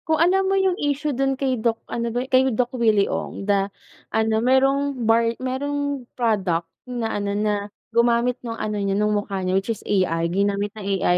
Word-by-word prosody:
Kung 320 0 +3
alam 380 +4 +3
mo 390 - +2
yung 380 -1 +3
issue 290 +1 0
dun 270 +1 0
kay 260 -4 -1
Doc 225 -1 +1
ano 235 0 -3
ba 245 +2 -2
yun 265 - -18
kay 255 0 +6
Doc 250 +1 0
Willie 220 -5 +3
Ong - - -4
da 200 -1 +2 0.4
ano 220 0 +1
merong 270 +2 +2
bar 230 +1 +3
merong 280 0 -3
product 195 -8 +1 0.2
na 240 -2 -2
ano 200 0 -1
na 210 0 +1 0.4
gumamit 235 +1 +2
nung 230 -2 -5
ano 210 -1 -2
niya 195 -1 0
ng 210 0 +2
mukha 200 -2 -2
niya 185 0 0
which 195 - -9
is 225 - -3
AI 170 -4 +1
Ginamit 200 +2 0
ng 215 - -9
AI 195 -3 +1
230 Hz, 200 wpm, -23 LUFS, 205-265 Hz, 0.4 s, kay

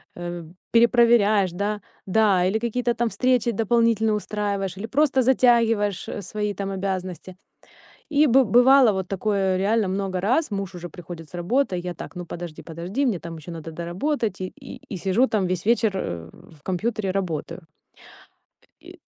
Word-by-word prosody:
М. 175 -1 -7 0.2
Перепроверяешь, 230 -5 +4
да? 205 +4 -2 0.3
Да, 195 -2 +3
или 190 +4 +1
какие-то 240 +1 -1
там 235 -1 0
встречи 250 -1 +1
дополнительные 225 0 +2
устраиваешь, 200 -3 -3
или 220 +4 -5
просто 270 0 +2
затягиваешь, 230 -6 +3
э, 205 - -5
свои 210 +2 -3
там 195 -1 -4
обязанности. 185 -2 -4 0.7
И 300 0 +4
бы 265 +1 +5
бывало 245 +3 +6
вот 190 -1 -3
такое 195 -1 0
реально 205 +2 +1
много 190 -1 -2
раз: 255 +10 +1
муж 195 -2 -4
уже 175 0 -7
приходит 165 -1 -10
с - - -24
работы, 195 +6 0
я 175 0 -4
так: - - -9
"Ну, 180 - -6
подожди, 170 -2 -8
подожди, 175 - -3
мне 220 -9 0
там 165 0 -8
ещё 160 +3 -10
надо 165 -1 -7
доработать". 185 - -2
И 185 - -3 0.4
и 195 - -3
сижу 195 +8 +2
там 205 -6 0
весь 180 +1 -3
вечер, 230 -1 +3
э, 85 - -4 0.2
в 150 - -22
компьютере, 195 +1 -2
работаю. 175 -2 -3 1.2
И. - - -13
200 Hz, 160 wpm, -24 LUFS, 180-230 Hz, 1.2 s, бывало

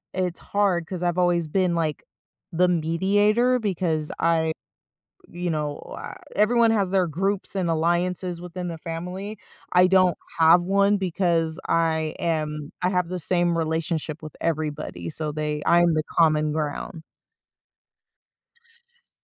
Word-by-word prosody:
it's 180 -2 -1
hard, 195 -5 0
'cause 180 +1 -6
I've 175 0 0
always 175 -2 +2
been, 180 +1 +1
like, 160 -3 -2 0.5
the 180 +2 +3
mediator, 205 +9 +2
because 170 -8 -1
I 160 -1 +2 0.8
you 175 0 -3
know, 150 -2 -2 0.6
everyone 230 +2 +4
has 205 -4 +2
their 190 -2 +2
groups 195 +6 -2
and 185 -3 -1
alliances 175 +2 0
within 180 0 -6
the 165 -1 -6
family, 180 +6 -6 0.4
I 180 0 +6
don't 185 -1 +4 0.2
have 165 +2 +6
one 200 +2 +3
because 170 -3 0
I 160 -2 +1
am 150 -2 -2
I 180 - +3
have 180 -2 0
the 185 +1 -3
same 175 0 +1
relationship 160 -1 -2
with 155 -1 -9
everybody, 150 - -3
so 155 -1 -3
they 150 0 -2
I'm 175 -1 +5
the 155 - +1
common 155 -2 +3
ground. 155 +1 -4 1.9
Ss 475 0 -19
170 Hz, 135 wpm, -24 LUFS, 160-185 Hz, 1.9 s, I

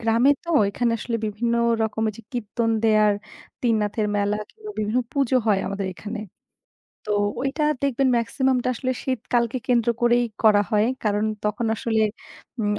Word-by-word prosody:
গ্রামে 230 +4 +3
তো 340 - -15
ঐখানে 230 +4 0
আসলে 230 +2 -2
বিভিন্ন 230 +3 -1 0.3
রকমের 220 0 -1
যে - - -10
কীর্তন 230 0 -1
দেয়ার 215 -2 +4 0.5
তিননাথের 215 -2 +1
মেলা, 205 0 +1
কিনবা 430 -1 -10
বিভিন্ন 215 +3 0
পুজো 275 -2 +2
হয় 205 -3 +4
আমাদের 195 0 -3
এখানে। 210 +4 -6 0.9
তো 210 - -2 0.3
ঐটা 275 +4 -1 0.2
দেখবেন 275 -1 +1
মেক্সিমামটা 255 +2 0
আসলে 255 +2 -2
শীত 255 -2 -1
কালকে 240 +1 +2
কেন্দ্র 240 -2 +3
করেই 240 0 +4 0.2
করা 210 -2 +6
হয় 210 +1 +3 0.2
কারণ 210 0 +1 0.2
তখন 210 +2 -1
আসলে 220 0 0 0.6
উম 210 -1 +1
225 Hz, 150 wpm, -23 LUFS, 210-245 Hz, 0.9 s, করা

